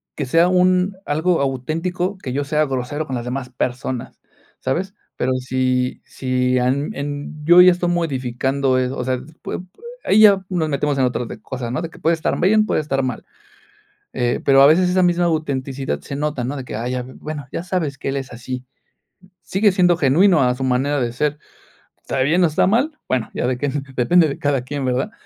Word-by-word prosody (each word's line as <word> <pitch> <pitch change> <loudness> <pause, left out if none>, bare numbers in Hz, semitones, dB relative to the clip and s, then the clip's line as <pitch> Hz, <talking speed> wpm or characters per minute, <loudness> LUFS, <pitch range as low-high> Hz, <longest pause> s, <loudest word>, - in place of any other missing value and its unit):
que 145 - -3
sea 165 +7 +4
un 185 +1 +2
algo 160 +3 +1
auténtico, 165 +8 -2
que 130 -9 -6
yo 145 +2 -1
sea 155 +2 +1
grosero 135 +3 -3
con 135 - -4
las 120 -1 -4
demás 125 +1 -4
personas, 125 0 -4 0.4
¿sabes?, 180 +9 -2 0.3
pero, 130 +1 +1
si 130 0 -1
si 125 -1 0
han 130 +4 0
en 145 +2 -6
yo 175 +3 +7
ya 180 0 +8
estoy 175 0 -1
modificando 135 -4 0
eso, 130 +1 -1
o 125 - -3
sea, 130 0 0 0.2
pue - - -4
pue 185 - -23 0.2
ahí 210 - +3
ya 200 -3 +6
nos 170 -4 -1
metemos 145 0 0
en 130 - +4
otras 125 -1 -2
de - - -9
cosas, 125 -3 -5
¿no?, 125 - -2
de 165 - -4
que - - -16
puede 165 - +2
estar 160 - -2
bien, 215 +4 +4
puede - - +1
estar 135 -3 -1
mal. 130 - -4 0.9
Eh, 120 -1 0
pero 135 -1 +6
a 140 - +9
veces 180 +4 +4
esa 185 +1 +3
misma 175 0 +2
autenticidad 135 - -2
se 140 - -7
nota, 150 -3 -2
¿no?, 130 +4 -3
de 135 - -5
que: 110 - -6
"Ay 120 +3 -3
ya, 125 0 -2
bueno, 145 +2 -7
ya - - -4
sabes 175 -7 -2
que 135 - -4
él 135 - -2
es 135 -1 -6
así". 125 +1 -6 0.8
Sigue 205 +2 +2
siendo 180 -3 +3
genuino 170 +4 +4
a 125 -1 +2
su 130 - -4
manera 130 +2 +1
de 120 -1 -1
ser, 150 +4 -1 0.6
¿está - - -4
bien, 160 +7 +3
o - - +4
está 155 +3 +2
mal?, 270 +10 +1
bueno, 125 -3 0
ya - - -2
de 125 -1 -1
que 145 - -2 0.3
depende 165 +7 +4
de 140 - -5
cada 145 -3 +1
quien, 135 +1 -4
¿verdad?, 130 - -1
140 Hz, 210 wpm, -20 LUFS, 130-170 Hz, 0.9 s, a